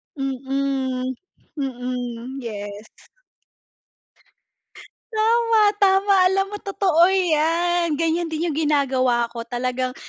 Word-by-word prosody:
Mm. 270 Hz, -1 st, -2 dB, 0.4 s
Mm, 250 Hz, -1 st, -4 dB
yes. 205 Hz, -2 st, -7 dB, 2.3 s
Tama, 455 Hz, +1 st, +2 dB, 0.2 s
tama. 395 Hz, 0 st, +4 dB
Alam 390 Hz, +1 st, +1 dB
mo 415 Hz, -, -4 dB
totoo 370 Hz, -4 st, +2 dB
'yan. 340 Hz, -2 st, +1 dB
Ganyan 330 Hz, +2 st, 0 dB
din 320 Hz, +1 st, -2 dB
yung 295 Hz, -, -5 dB
ginagawa 260 Hz, -6 st, +1 dB
ko 230 Hz, -1 st, -7 dB
talagang 255 Hz, +1 st, -2 dB
275 Hz, 90 wpm, -22 LUFS, 255-350 Hz, 2.3 s, tama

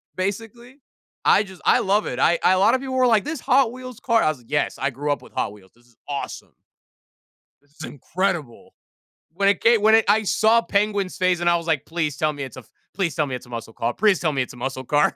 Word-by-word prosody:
basically, 225 Hz, +7 st, -5 dB, 0.5 s
I 210 Hz, -, +5 dB
just 190 Hz, -3 st, -13 dB
I -, -, +5 dB
love 210 Hz, -1 st, +1 dB
it. 125 Hz, -, -4 dB
I 170 Hz, +5 st, +3 dB
I 185 Hz, -, +5 dB
a 185 Hz, -, +2 dB
lot 200 Hz, -, +4 dB
of 260 Hz, -, -2 dB
people 265 Hz, -1 st, -5 dB
were 255 Hz, 0 st, +3 dB
like, 220 Hz, -4 st, +3 dB
"This 310 Hz, 0 st, -4 dB
Hot 260 Hz, -2 st, +3 dB
Wheels 255 Hz, -1 st, -10 dB
car?" 230 Hz, -2 st, +2 dB
I -, -, +3 dB
was 155 Hz, -4 st, -4 dB
like, 120 Hz, -, -22 dB
"Yes. 150 Hz, -, -1 dB
I 140 Hz, -, 0 dB
grew 145 Hz, +3 st, -3 dB
up 145 Hz, -, -2 dB
with -, -, -16 dB
Hot 100 Hz, -, -2 dB
Wheels. 95 Hz, -3 st, -18 dB
This 120 Hz, 0 st, -27 dB
is 120 Hz, -, -28 dB
awesome." 140 Hz, -1 st, -6 dB, 1.1 s
"This 145 Hz, 0 st, -33 dB
is -, -, -8 dB
incredible." 165 Hz, -2 st, -4 dB, 0.6 s
When 195 Hz, +3 st, +1 dB
it 200 Hz, -, +1 dB
ca 235 Hz, 0 st, +5 dB
when 220 Hz, +1 st, +5 dB
it 225 Hz, -, +3 dB
I 215 Hz, +2 st, +3 dB
saw 220 Hz, +3 st, +3 dB
Penguin's 205 Hz, -3 st, -1 dB
face, 185 Hz, -1 st, +1 dB
and 175 Hz, 0 st, +2 dB
I 170 Hz, -, +4 dB
was 170 Hz, 0 st, -8 dB
like, 160 Hz, -5 st, 0 dB
"Please 155 Hz, -4 st, -3 dB
tell 155 Hz, 0 st, 0 dB
me 145 Hz, -1 st, -6 dB
it's 130 Hz, -2 st, -9 dB
a 130 Hz, -, -9 dB, 0.3 s
please 175 Hz, -7 st, -2 dB
tell 150 Hz, -, +1 dB
me 130 Hz, -3 st, -4 dB
it's 125 Hz, -, -9 dB
a 125 Hz, -, -18 dB
muscle 115 Hz, -1 st, -7 dB
car. 120 Hz, +1 st, -2 dB
Please 205 Hz, -3 st, +2 dB
tell 160 Hz, -, 0 dB
me 135 Hz, -2 st, -1 dB
it's 125 Hz, -, -5 dB
a -, -, -14 dB
muscle 130 Hz, +1 st, -4 dB
car." 145 Hz, +3 st, +2 dB
180 Hz, 260 wpm, -22 LUFS, 140-215 Hz, 1.1 s, I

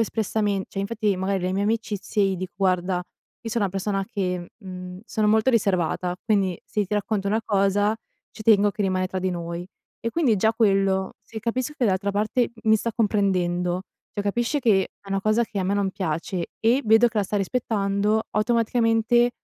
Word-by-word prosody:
espressamen 210 Hz, -3 st, 0 dB
cioè 195 Hz, -, -7 dB
infatti, 210 Hz, -1 st, 0 dB
magari, 190 Hz, 0 st, 0 dB
le 185 Hz, +1 st, -1 dB
mie 200 Hz, +1 st, 0 dB
amicizie 210 Hz, -2 st, 0 dB
gli 190 Hz, -1 st, 0 dB
dico: 185 Hz, 0 st, -6 dB
"Guarda 185 Hz, -1 st, +1 dB, 0.4 s
io 225 Hz, -, -5 dB
so 235 Hz, -, 0 dB
una 200 Hz, -2 st, +1 dB
persona 195 Hz, +1 st, -2 dB
che 180 Hz, -5 st, -2 dB
mhmm, 180 Hz, -2 st, -8 dB
sono 215 Hz, -2 st, 0 dB
molto 220 Hz, +4 st, +4 dB
riservata, 185 Hz, -5 st, +1 dB
quindi 195 Hz, -5 st, +1 dB
se 210 Hz, -1 st, -1 dB
ti 210 Hz, -, -2 dB
racconto 205 Hz, -1 st, -1 dB
una 220 Hz, +2 st, +1 dB
cosa 205 Hz, +1 st, +2 dB, 0.4 s
ci 215 Hz, -, -9 dB
tengo 205 Hz, -2 st, +5 dB
che 205 Hz, +1 st, -3 dB
rimane 185 Hz, -1 st, +1 dB
tra 185 Hz, 0 st, -4 dB
di 185 Hz, 0 st, 0 dB
noi." 170 Hz, 0 st, -5 dB, 0.3 s
E 230 Hz, -, -1 dB
quindi 260 Hz, -9 st, +2 dB
già 220 Hz, +4 st, +3 dB
quello, 195 Hz, -4 st, +2 dB
se 225 Hz, -, -8 dB
capisco 250 Hz, +5 st, -2 dB
che 250 Hz, -, +1 dB
dall'altra 200 Hz, 0 st, +1 dB
parte 215 Hz, +4 st, +1 dB
m 220 Hz, -, -2 dB
mi 220 Hz, -, +7 dB
sta 230 Hz, +1 st, -3 dB
comprendendo, 185 Hz, -4 st, +1 dB, 0.3 s
cioè, 205 Hz, -, -2 dB
capisci 240 Hz, +7 st, 0 dB
che 205 Hz, -6 st, +4 dB, 0.2 s
è 200 Hz, -, -15 dB
una 195 Hz, 0 st, 0 dB
cosa 215 Hz, +3 st, +2 dB
che 215 Hz, -2 st, -6 dB
a 185 Hz, -, 0 dB
me 200 Hz, +2 st, +1 dB
non 200 Hz, -1 st, +1 dB
piace 175 Hz, -1 st, -3 dB
e 235 Hz, +5 st, +3 dB
vedo 225 Hz, +2 st, +6 dB
che 225 Hz, -2 st, -2 dB
la 200 Hz, -, +2 dB
sta 205 Hz, -, -2 dB
rispettando, 205 Hz, 0 st, 0 dB
automaticamente 230 Hz, +1 st, +2 dB
205 Hz, 195 wpm, -24 LUFS, 190-220 Hz, 0.4 s, mi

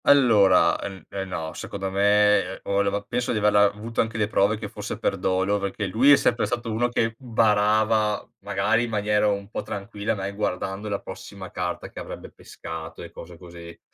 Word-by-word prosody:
Allora, 110 Hz, -10 st, +5 dB
ehm, 95 Hz, -2 st, -7 dB
eh 95 Hz, -1 st, -4 dB
no. 80 Hz, -4 st, -5 dB
Secondo 95 Hz, -1 st, -5 dB
me, 105 Hz, +1 st, +4 dB
ehm, 95 Hz, +2 st, -7 dB
o 100 Hz, 0 st, +1 dB
leva 100 Hz, 0 st, 0 dB
penso 120 Hz, +4 st, -2 dB
di -, -, -1 dB
averla 105 Hz, -1 st, +4 dB
avuto 105 Hz, +3 st, -1 dB
anche 110 Hz, 0 st, -3 dB
le 105 Hz, -1 st, +1 dB
prove 105 Hz, 0 st, +2 dB
che 105 Hz, -1 st, -6 dB
fosse -, -, -6 dB
per -, -, 0 dB
dolo 95 Hz, +2 st, +1 dB
perché 100 Hz, +1 st, -3 dB
lui 115 Hz, +9 st, +4 dB
è -, -, +10 dB
sempre 120 Hz, -3 st, +1 dB
stato 120 Hz, -1 st, -3 dB
uno 120 Hz, +3 st, +1 dB
che 115 Hz, -1 st, 0 dB
barava, 110 Hz, -2 st, +2 dB
magari 100 Hz, +4 st, +1 dB
in -, -, -6 dB
maniera 105 Hz, -1 st, +1 dB
un 100 Hz, -1 st, -1 dB
po' -, -, -3 dB
tranquilla, 100 Hz, +1 st, -4 dB
mai 100 Hz, 0 st, -4 dB
guardando 100 Hz, 0 st, -3 dB
la 100 Hz, -1 st, -2 dB
prossima 95 Hz, 0 st, -9 dB
carta 90 Hz, -1 st, -4 dB
che -, -, -9 dB
avrebbe -, -, -8 dB
pescato 80 Hz, -1 st, -9 dB
e -, -, -10 dB
cose 85 Hz, 0 st, -11 dB
così. 85 Hz, -1 st, -12 dB
100 Hz, 195 wpm, -24 LUFS, 95-110 Hz, -, è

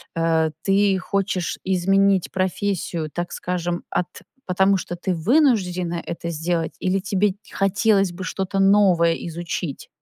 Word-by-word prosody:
Э, 165 Hz, -1 st, +1 dB
ты 195 Hz, 0 st, +3 dB
хочешь 195 Hz, -1 st, -2 dB
изменить 195 Hz, 0 st, +2 dB
профессию, 185 Hz, -4 st, -2 dB
так 175 Hz, 0 st, -4 dB
скажем, 175 Hz, -1 st, -3 dB
от 180 Hz, -, 0 dB, 0.4 s
потому 190 Hz, +2 st, +3 dB
что 175 Hz, -1 st, -5 dB
ты 185 Hz, +2 st, -2 dB
вынуждена 180 Hz, -, +1 dB
это 170 Hz, 0 st, -5 dB
сделать 165 Hz, +1 st, -2 dB
или 185 Hz, +1 st, +1 dB
тебе 200 Hz, 0 st, 0 dB, 0.2 s
хотелось 195 Hz, -1 st, +2 dB
бы 180 Hz, +2 st, -7 dB
что-то 190 Hz, +1 st, -3 dB
новое 195 Hz, -4 st, +4 dB
изучить? 170 Hz, -2 st, -5 dB
185 Hz, 125 wpm, -22 LUFS, 170-195 Hz, 0.4 s, новое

